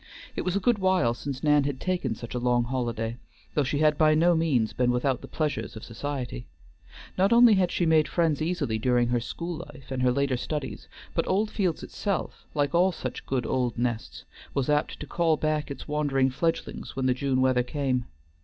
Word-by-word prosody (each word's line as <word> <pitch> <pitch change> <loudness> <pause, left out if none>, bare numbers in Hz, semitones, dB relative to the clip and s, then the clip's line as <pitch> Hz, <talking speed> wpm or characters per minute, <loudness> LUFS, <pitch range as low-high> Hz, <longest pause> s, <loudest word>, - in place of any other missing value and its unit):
It - - -1
was 185 0 -1
a - - +2
good 225 +2 +2
while 185 -11 +3
since 135 +3 -6
Nan 150 -1 +4
had 140 -2 -2
taken 175 -11 -1
such 120 +2 -8
a 125 - -1
long 120 0 +2
holiday, 120 -2 -2 0.4
though 150 - +2
she 135 +2 -1
had 150 0 +3
by 155 -1 +5
no 170 +3 +4
means 150 -9 +1
been 125 -1 +1
without 125 +1 +1
the - - -9
pleasures 150 -6 -2
of 110 - -8
society. 125 - -5 0.7
Not 195 +3 +4
only 235 -1 +7
had 190 -3 +3
she 175 - +1
made 160 -1 +4
friends 160 -4 +1
easily 155 -9 -1
during 120 0 +2
her 120 0 +2
school 170 +7 -5
life 135 -2 -15
and 130 -1 -2
her 125 0 +4
later 140 0 +1
studies, 145 +1 -4 0.3
but - - 0
Oldfields 195 -4 0
itself, 200 -4 -3
like 145 +1 +1
all 180 +2 +4
such - - -6
good 130 -3 -1
old 125 -3 0
nests, 120 -2 -3 0.3
was 140 -1 0
apt 150 +1 0
to - - -4
call 165 0 +1
back 155 -1 -1
its 140 - -7
wandering 140 -3 +1
fledglings 165 +5 -2
when 130 - -1
the 130 - +4
June 130 0 0
weather 130 -1 +3
came. 130 -1 -1
140 Hz, 200 wpm, -27 LUFS, 125-165 Hz, 0.7 s, only